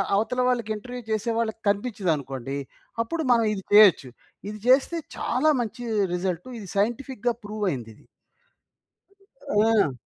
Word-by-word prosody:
అవతల 240 +5 0
వాళ్ళకి 235 -4 0
ఇంటర్‌వ్యూ 245 +4 -7
చేసే 215 +2 0
వాళ్ళకి 225 -1 -2
కనిపించిందనుకోండి, 155 - -2 0.5
అప్పుడు 320 +7 -3
మనం 230 -1 +3
ఇది 195 -2 -5
చేయొచ్చు. 200 -10 +7 0.4
ఇది 210 - -6
చేస్తే 275 +6 +4 0.2
చాలా 310 - +2
మంచి 240 +2 -5 0.3
రిజల్ట్. 180 +2 -2
ఇది 200 - -9
సైంటిఫిక్‌గా 240 +3 0
ప్రూవ్ 210 0 -3
అయింది 120 -7 -5
ఇది. - - -22 1.4
ఆ! 210 -6 +3
215 Hz, 125 wpm, -25 LUFS, 190-245 Hz, 1.4 s, చేయొచ్చు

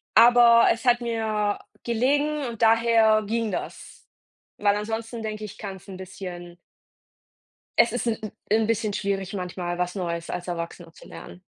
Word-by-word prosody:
aber 235 -1 +7
es 230 +3 -3
hat 245 -1 +4
mir 220 -3 -1 0.2
gelegen 285 +5 +1
und 235 -2 -7
daher 225 -1 +4
ging 225 0 -1
das. - - -7 0.5
Weil 205 -1 +2
ansonsten 225 +2 -4
denke 215 0 -5
ich, 205 - -10
kann 195 -2 -6
es 185 - -19
'n 190 - -8
bisschen 180 -2 -8 1.2
Es 235 - +6
ist 245 0 -2
'n- 225 - +1 0.3
'n 220 +1 +3
bisschen 220 -1 0
schwierig, 195 -1 -2
manchmal 180 -2 -4
was 180 0 -1
Neues 170 -3 -4
als 180 +1 -5
Erwachsener 170 -1 -6
zu - - -15
lernen. 180 - -11
215 Hz, 155 wpm, -25 LUFS, 185-230 Hz, 1.2 s, aber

